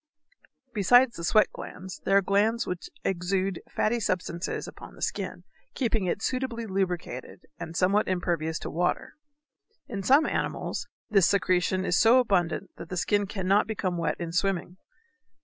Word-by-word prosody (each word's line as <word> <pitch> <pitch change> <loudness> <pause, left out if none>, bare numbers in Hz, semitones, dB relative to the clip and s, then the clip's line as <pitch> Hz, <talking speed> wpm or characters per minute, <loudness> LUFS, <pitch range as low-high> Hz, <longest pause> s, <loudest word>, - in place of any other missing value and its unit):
Besides 245 +5 +5
the 170 - -7
sweat 215 +5 +4
glands 185 0 -8
there 195 - +4
are 200 - +3
glands 210 +5 +2
which 180 - -5
exude 185 0 -1
fatty 235 +2 0
substances 180 -3 -2
upon - - -11
the - - -15
skin, - - -3 0.3
keeping 225 -7 0
it 190 - -2
suitably 255 -3 -2
lubricated 180 - -3
and 165 0 -6
somewhat 200 +3 +3
impervious 170 -3 -1
to - - -5
water. 175 +2 -1 0.7
In 200 -4 -4
some 275 +10 +5
animals - - -2 0.2
this 195 -4 +5
secretion 185 -1 +1
is 175 - +2
so 230 +3 +6
abundant 195 -6 +1
that 165 - -9
the 180 - -4
skin 205 +3 +1
cannot 195 +1 +1
become 195 -5 -2
wet 170 -1 -1
in 170 -1 -4
swimming. 180 0 -1
190 Hz, 150 wpm, -27 LUFS, 180-215 Hz, 0.7 s, so